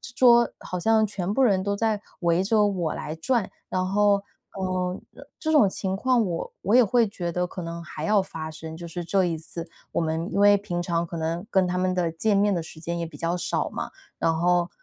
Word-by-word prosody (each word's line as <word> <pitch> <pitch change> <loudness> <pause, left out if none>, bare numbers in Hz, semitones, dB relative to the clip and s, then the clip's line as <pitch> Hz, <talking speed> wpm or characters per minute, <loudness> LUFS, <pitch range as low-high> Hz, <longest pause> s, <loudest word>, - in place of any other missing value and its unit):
桌 240 -2 +6
桌 - - -11
好 180 - -5
像 220 +3 +3
全 195 -1 -3
部 270 - +2
人 195 -7 +3
都 200 0 0
在 215 0 0 0.2
围 170 +1 +2
着 210 +1 +3
我 175 -6 -1
来 155 - -5
转。 230 +5 0 0.2
然 185 0 0
后， 200 0 +3 0.3
呃， 185 -1 -1 0.4
这 315 - -1
种 225 -10 +6
情 190 0 -3
况 245 +1 +2
我 170 -3 -3
我 205 +6 +3
也 250 - +8
会 230 +1 +3
觉 175 -4 -4
得 180 +1 0
可 180 - -7
能 170 0 -5
还 155 -1 -7
要 210 +2 +3
发 160 -4 -6
生， 160 0 -8
就 170 +1 -8
是 175 +1 -5
这 190 +2 +2
一 170 -2 -1
次， 165 +1 -8 0.2
我 - - +1
们 160 +2 -1
因 - - 0
为 205 0 +7
平 180 -4 -3
常 170 -1 0
可 170 - -7
能 165 +4 -2
跟 190 -4 +3
他 180 +1 -1
们 185 0 +1
的 175 -2 0
见 200 +6 +1
面 205 +1 +3
的 175 - 0
时 160 - -11
间 170 +1 -3
也 170 - -2
比 160 -2 -10
较 170 +3 -1
少 - - -1
嘛， - - -5 0.3
然 165 0 +2
后 175 +1 +2
185 Hz, 250 characters per minute, -25 LUFS, 170-205 Hz, 0.4 s, 也